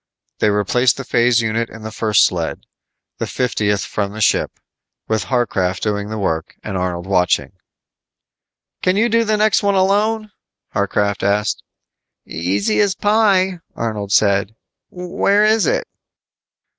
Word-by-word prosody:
They 105 - +3
replaced 105 +5 +2
the 135 - -5
phase 120 -1 +2
unit 115 +1 -1
in 110 0 -11
the 110 - -6
first 110 -2 +3
sled 85 -3 -2 0.6
the - - -2
fiftieth 105 -5 -1
from 100 -1 -3
the 110 - -7
ship 105 - +1 0.5
with 110 -4 -1
Harcraft 100 -7 0
doing 105 -1 -2
the 110 - -4
work 80 -6 -2
and 95 - -5
Arnold 90 -1 -2
watching. 90 -2 +1 1.3
"Can 185 - +2
you 230 +3 +3
do 230 0 +3
the 215 -1 +1
next 215 0 +3
one 200 -1 +1
alone?" 210 +3 +1 0.4
Harcraft 100 0 0
asked. 105 +2 0 0.6
"Easy 95 - -1
as 200 -3 +2
pie," 200 -4 +2 0.2
Arnold 105 -3 -4
said. 100 0 +2 0.3
"Where 185 +3 +1
is 215 -5 +3
it?" - - 0
110 Hz, 140 wpm, -18 LUFS, -, 1.3 s, They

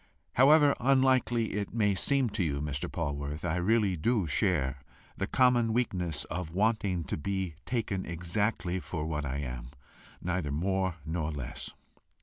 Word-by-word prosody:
However 145 +2 +6
unlikely 130 -3 +3
it 105 +2 -3
may 105 -3 +3
seem 130 +4 +2
to 100 - 0
you, 70 -4 -1
Mr. 70 -1 -3
Polwarth, 75 0 -3
I 90 0 0
really 100 +1 +2
do 105 +4 +1
share 75 -5 +1 0.3
the 95 - -2
common 120 -3 +3
weakness 90 -10 -1
of 85 -1 -5
wanting 100 -4 +1
to - - -3
be 95 +1 -2
taken 110 -6 -1
exactly 90 +2 -1
for 85 -3 -4
what 75 -2 -2
I 65 +1 -2
am, 60 -3 -5 0.5
neither 90 -4 -2
more 95 +3 0
nor 80 -1 -2
less." 70 -3 -6
90 Hz, 145 wpm, -30 LUFS, 80-110 Hz, 0.5 s, However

